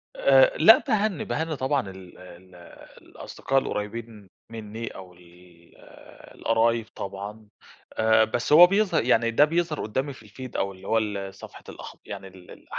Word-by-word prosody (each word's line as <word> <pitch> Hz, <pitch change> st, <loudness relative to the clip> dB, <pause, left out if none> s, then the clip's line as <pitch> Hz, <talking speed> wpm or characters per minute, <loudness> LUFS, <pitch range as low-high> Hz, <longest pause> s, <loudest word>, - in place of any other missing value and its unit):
آآ، -, -, +4 dB
لا، -, -, +8 dB
باهنّي، 215 Hz, -, 0 dB
باهنّي، 160 Hz, 0 st, -3 dB
طبعًا 130 Hz, -5 st, -1 dB
ال 95 Hz, -2 st, -13 dB
ال 90 Hz, 0 st, -15 dB, 0.5 s
الأصدقاء 135 Hz, 0 st, -3 dB
القريبين 105 Hz, -3 st, -6 dB, 0.2 s
مِنّي 110 Hz, 0 st, -7 dB
أو 95 Hz, -2 st, -10 dB
ال 85 Hz, -1 st, -21 dB, 0.6 s
القرايب 115 Hz, 0 st, +1 dB
طبعًا، 100 Hz, +2 st, -8 dB, 0.5 s
آآ، 110 Hz, 0 st, +3 dB
بس 120 Hz, +5 st, -2 dB
هو 175 Hz, +3 st, +10 dB
بيظه 200 Hz, +1 st, +1 dB
يعني، 115 Hz, -1 st, +2 dB
ده 145 Hz, +6 st, +5 dB
بيظهر 165 Hz, 0 st, -2 dB
قدّامي 130 Hz, +6 st, -3 dB
في 115 Hz, -4 st, -16 dB
الfeed 125 Hz, +4 st, -9 dB
أو 100 Hz, -, -1 dB
اللي 95 Hz, +1 st, -14 dB
هو 115 Hz, -, +1 dB
ال 100 Hz, -3 st, -3 dB
صفحة -, -, -13 dB
الأخب -, -, -11 dB
يعني 95 Hz, -, -8 dB
ال 95 Hz, -1 st, -16 dB
ال -, -, -15 dB
110 Hz, 155 wpm, -25 LUFS, 95-135 Hz, 0.6 s, هو